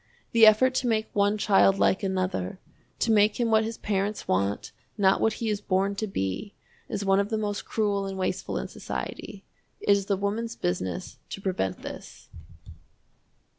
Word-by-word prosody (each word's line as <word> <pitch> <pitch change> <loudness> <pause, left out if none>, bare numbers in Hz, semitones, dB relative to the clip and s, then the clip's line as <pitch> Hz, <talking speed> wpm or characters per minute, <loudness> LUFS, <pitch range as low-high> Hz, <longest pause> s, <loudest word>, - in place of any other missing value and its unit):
The 225 -1 +7
effort 255 +5 +5
to 255 -1 0
make 220 -2 0
one 205 +1 +2
child 195 -1 +4
like 190 - +2
another, 185 - -2 0.4
to - - +1
make 210 +1 +4
him 235 -2 +1
what 220 0 +4
his 225 +1 -4
parents 205 +1 -2
want, 100 +2 0 0.3
not 195 -2 +3
what 220 - +3
he 230 - -4
is 205 0 -2
born 195 0 +1
to 215 - -2
be, 190 - -3 0.3
is 200 -1 -3
one 195 0 +4
of 200 0 0
the 220 - 0
most 205 -1 -3
cruel 205 -3 0
and 195 0 -5
wasteful 185 - -2
in - - -3
society. 200 -1 -6 0.3
It - - -6
is 200 -1 +3
the 200 - +1
woman's 220 +4 -2
business 90 0 -3
to - - -6
prevent 185 - -2
this. - - -9
200 Hz, 175 wpm, -27 LUFS, 190-215 Hz, 0.4 s, The